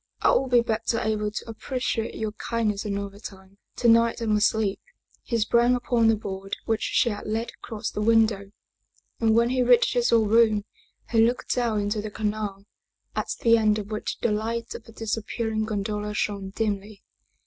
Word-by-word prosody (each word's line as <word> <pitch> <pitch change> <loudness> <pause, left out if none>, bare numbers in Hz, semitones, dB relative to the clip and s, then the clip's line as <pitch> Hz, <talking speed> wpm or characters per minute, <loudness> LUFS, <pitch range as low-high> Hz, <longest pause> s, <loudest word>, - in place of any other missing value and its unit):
I - - +4
will 270 - +2
be 245 -2 +5
better 225 0 -1
able 215 -1 -1
to 210 - -6
appreciate 230 0 -3
your 220 -1 -3
kindness 215 -2 -2
another 200 -1 -4
time. 195 -1 -12 0.2
To 240 - +1
night 230 0 +4
I 230 - -3
must 210 -1 +3
sleep." 215 -3 -1 0.4
He 235 - -2
sprang 235 +3 +3
upon 240 -2 +1
the 225 - +5
board 195 -2 -5
which 225 -1 0
she 240 - +2
had 205 0 -6
laid 225 +2 -2
across 220 -1 -6
the 210 - -4
window, 215 -3 +2 0.7
and 225 -1 +3
when 235 +1 +3
he 255 0 +1
reached 245 -1 +4
his 240 -1 +2
own 225 -2 +4
room 215 -2 +4 0.5
he 225 -1 +5
looked 240 +2 0
down 230 -4 0
into 205 +1 -1
the 215 - -5
canal, 210 -2 -3 0.5
at - - -1
the 230 0 +5
end 215 -1 +3
of 210 0 -6
which 215 - -3
the 235 - +1
light 225 +2 -2
of 230 - -9
the - - -14
disappearing 220 0 -2
gondola 210 0 -3
shone 200 -2 -2
dimly. 205 0 -3
220 Hz, 185 wpm, -25 LUFS, 210-230 Hz, 0.7 s, be